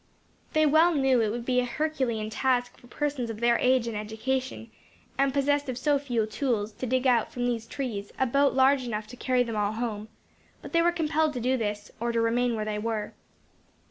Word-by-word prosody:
They 310 Hz, 0 st, +4 dB
well 320 Hz, +3 st, +4 dB
knew 265 Hz, -3 st, +3 dB
it 220 Hz, -, +1 dB
would 235 Hz, +2 st, -4 dB
be 250 Hz, 0 st, +2 dB
a -, -, +2 dB
herculean 245 Hz, -6 st, -2 dB
task 245 Hz, 0 st, 0 dB
for 245 Hz, -, -18 dB
persons 280 Hz, -3 st, -2 dB
of 220 Hz, -1 st, -6 dB
their 235 Hz, 0 st, +3 dB
age 255 Hz, -1 st, +3 dB
and 230 Hz, -, -4 dB
education, 225 Hz, +3 st, -3 dB, 0.4 s
and 275 Hz, 0 st, +2 dB
possessed 285 Hz, +1 st, +1 dB
of 250 Hz, -, -3 dB
so 285 Hz, +2 st, +2 dB
few 245 Hz, -6 st, -1 dB
tools, 220 Hz, -2 st, -1 dB
to 255 Hz, +4 st, -6 dB
dig 255 Hz, +2 st, 0 dB
out, 240 Hz, -4 st, +3 dB
from 245 Hz, -1 st, -3 dB
these 230 Hz, -2 st, -2 dB
trees, 225 Hz, -7 st, -5 dB
a 265 Hz, -, +2 dB
boat 275 Hz, +3 st, +2 dB
large 265 Hz, 0 st, +4 dB
enough 215 Hz, -3 st, -3 dB
to 250 Hz, -, -9 dB
carry 250 Hz, 0 st, +1 dB
them 230 Hz, -2 st, -5 dB
all 210 Hz, 0 st, 0 dB
home; 220 Hz, -2 st, -4 dB, 0.5 s
but -, -, -11 dB
they 335 Hz, -, +4 dB
were 345 Hz, +1 st, +3 dB
compelled 315 Hz, -2 st, 0 dB
to 250 Hz, -, -3 dB
do 255 Hz, +2 st, +1 dB
this, 210 Hz, -3 st, -3 dB
or 235 Hz, +1 st, -1 dB
to 230 Hz, -, 0 dB
remain 235 Hz, +1 st, +1 dB
where 215 Hz, -1 st, -3 dB
they 210 Hz, -1 st, -2 dB
were. 220 Hz, -1 st, -3 dB
245 Hz, 215 wpm, -27 LUFS, 225-275 Hz, 0.5 s, They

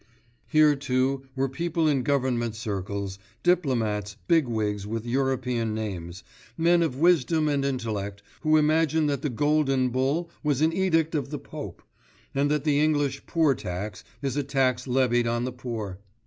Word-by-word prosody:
Here, 155 Hz, -2 st, +5 dB
too, 135 Hz, 0 st, 0 dB
were 135 Hz, 0 st, +1 dB
people 165 Hz, +4 st, -1 dB
in 140 Hz, -3 st, +2 dB
government 125 Hz, -4 st, 0 dB
circles, 100 Hz, -3 st, -4 dB, 0.2 s
diplomats, 115 Hz, -, +1 dB
big 165 Hz, -6 st, +4 dB
wigs 105 Hz, -3 st, -2 dB
with 115 Hz, +1 st, -3 dB
European 125 Hz, -3 st, 0 dB
names, 95 Hz, -5 st, -5 dB, 0.3 s
men 170 Hz, +1 st, +4 dB
of 160 Hz, -6 st, 0 dB
wisdom 160 Hz, 0 st, +3 dB
and 140 Hz, -2 st, +1 dB
intellect, 105 Hz, -7 st, -3 dB, 0.2 s
who 155 Hz, -1 st, +3 dB
imagine 155 Hz, 0 st, +3 dB
that 145 Hz, -1 st, 0 dB
the 150 Hz, -, -1 dB
Golden 135 Hz, 0 st, +2 dB
Bull 140 Hz, +7 st, 0 dB
was 145 Hz, -4 st, +1 dB
an 160 Hz, +1 st, +3 dB
edict 165 Hz, -4 st, +1 dB
of 145 Hz, -3 st, -1 dB
the 150 Hz, -, -4 dB
Pope, -, -, -8 dB, 0.5 s
and 140 Hz, +1 st, +1 dB
that 150 Hz, -2 st, +1 dB
the 145 Hz, -2 st, +2 dB
English 145 Hz, -3 st, +1 dB
poor 160 Hz, -4 st, +3 dB
tax 100 Hz, -2 st, -5 dB, 0.2 s
is 135 Hz, -2 st, -1 dB
a 145 Hz, -, +1 dB
tax 130 Hz, -2 st, 0 dB
levied 125 Hz, -2 st, +2 dB
on 120 Hz, +1 st, 0 dB
the 130 Hz, 0 st, -3 dB
poor. 110 Hz, -7 st, -5 dB
135 Hz, 160 wpm, -26 LUFS, 115-150 Hz, 0.5 s, Here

